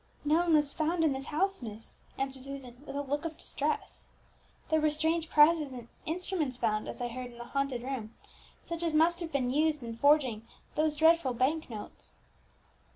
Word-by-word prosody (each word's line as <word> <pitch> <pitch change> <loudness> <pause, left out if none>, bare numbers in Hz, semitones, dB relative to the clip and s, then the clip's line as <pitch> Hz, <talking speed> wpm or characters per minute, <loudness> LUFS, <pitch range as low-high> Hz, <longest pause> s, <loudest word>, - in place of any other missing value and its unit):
"No 300 +2 +4
one 340 -2 +4
was 295 -2 +3
found 325 +1 +1
in 310 -3 +3
this 270 +1 -5
house, 385 +4 0
miss," 220 -1 -7 0.2
answered 270 -1 -2
Susan, 265 -2 -8
with - - -6
a 285 - -1
look 285 +2 -2
of 320 -2 -4
distress. 295 +2 -3 0.6
"There 315 0 +3
were 305 - +4
strange 320 +2 0
presses 300 -1 +5
and 245 -2 -9 0.2
instruments 325 -5 -1
found, 215 -3 0
as - - -6
I 245 - 0
heard, 250 +1 -6
in 235 - -14
the 240 - -6
haunted 270 -1 -2
room, 250 -4 -5 0.5
such 335 0 -5
as 330 -2 0
must 335 +2 +4
have 335 -2 -4
been 255 -3 0
used 300 0 +2
in 230 -1 -5
forging 250 -4 +3 0.3
those 310 0 +1
dreadful 320 -4 +4
bank 285 +6 +1
notes." 215 -3 -8
290 Hz, 190 wpm, -31 LUFS, 250-320 Hz, 0.6 s, presses